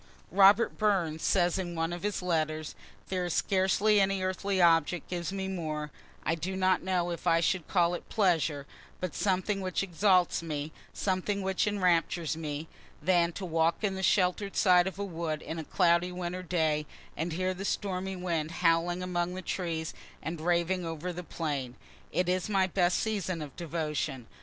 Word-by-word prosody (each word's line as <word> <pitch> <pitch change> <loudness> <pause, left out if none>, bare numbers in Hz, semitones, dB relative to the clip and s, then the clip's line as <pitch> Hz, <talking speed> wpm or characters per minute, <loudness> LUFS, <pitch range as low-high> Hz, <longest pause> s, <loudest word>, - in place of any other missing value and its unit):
(Robert 200 +4 +5
Burns 180 -7 +1
says 175 -1 +2
in 175 -2 -4
one 165 +1 -1
of 175 - -5
his 205 -2 -2
letters: 155 -3 -1 0.4
"There 185 -1 -1
is 175 - -2
scarcely 200 +2 +3
any 195 -1 +1
earthly 190 +1 -1
object 170 -1 +3
gives 175 0 -2
me 195 -1 -3
more 155 -5 -3 0.3
I 160 - +2
do 170 +4 -3
not 185 -1 +2
know 180 -2 0
if 170 +1 -5
I 165 -1 +5
should 175 0 0
call 175 -2 +2
it 175 - -6
pleasure 165 -8 +1 0.3
but 185 -2 -3
something 195 +1 0
which 185 0 -1
exalts 185 -1 +3
me 155 -2 -4 0.2
something 195 +1 -1
which 190 +1 0
enraptures 175 -5 +1
me 155 -1 -4 0.3
than 175 +1 +3
to 190 - -5
walk 165 +2 +1
in 200 -2 +1
the 190 - -4
shelter' 190 +1 +2
d - - -10
side 180 -1 +5
of 190 - -5
a 200 - -2
wood 165 -4 -3
in 160 - -5
a - - -4
cloudy 170 +3 +2
winter 180 0 -4
day, 160 -4 0 0.3
and 160 +2 -2
hear 185 +2 0
the 185 +1 -6
stormy 190 -1 -2
wind 170 -4 -2
howling 175 +1 +1
among 180 0 -1
the 185 - -6
trees, 165 -4 -3 0.3
and 160 +2 -4
raving 175 +2 +1
over 165 +2 -4
the 180 +1 -6
plain. 145 -6 -3 0.4
It 180 - 0
is 185 +2 0
my 195 -2 +3
best 180 -1 +2
season 195 -5 -1
of 140 -3 -10
devotion." 150 -6 -3
175 Hz, 180 wpm, -30 LUFS, 165-190 Hz, 0.4 s, Robert